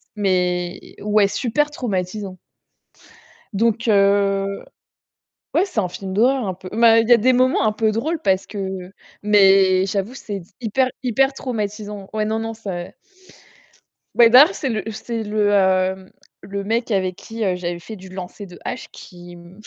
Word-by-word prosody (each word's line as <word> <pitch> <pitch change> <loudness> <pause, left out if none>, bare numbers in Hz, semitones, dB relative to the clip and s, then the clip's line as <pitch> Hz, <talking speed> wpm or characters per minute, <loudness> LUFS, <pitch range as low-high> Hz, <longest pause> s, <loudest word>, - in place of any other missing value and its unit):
mais, 180 -3 -1
ouais, 210 -1 +3
super 260 +8 0
traumatisant 195 -7 -4 1.2
donc 230 +3 0
heu, 200 -1 +2 0.9
ouais, 360 - +4
c'est 370 - -3
un 185 -4 -1
film 190 +1 -7
d'horreur 250 +4 +2
un 190 - -2
peu 185 +1 -11
mais 230 +1 +5
il 225 - -4
y 240 - +8
des 255 +4 +3
moments 255 +1 +3
un 215 - +3
peu 215 0 0
drôles 310 +10 -2
parce 190 -5 +1
que 190 -3 -6 0.3
mais 195 -2 +5
j'avoue, 200 +4 -2
c'est 205 -7 -6 0.2
hyper, 255 +3 +1
hyper 270 +3 +2
traumatisant. 210 -5 -5
Ouais, 215 -1 0
non, 220 +1 -1
non, 225 0 -4
c'est 190 -6 -7 1.2
Bébert 250 +10 +7
c'est 270 - -3
le 215 -3 -2
c'est 225 +1 -5
le, 210 -1 0
hem, 190 -1 +1 0.3
le 200 0 -5
mec 230 +4 -1
avec 185 -2 0
qui, 225 +4 -6
heu, 185 -2 +1
j'avais 175 -1 -4
fait 215 +6 -9
du 190 -1 -12
lancer 185 +2 -8
de 175 -1 -13
hache - - -5
qui, 175 -1 -13
hem, 175 +3 -15
205 Hz, 160 wpm, -21 LUFS, 190-230 Hz, 1.2 s, y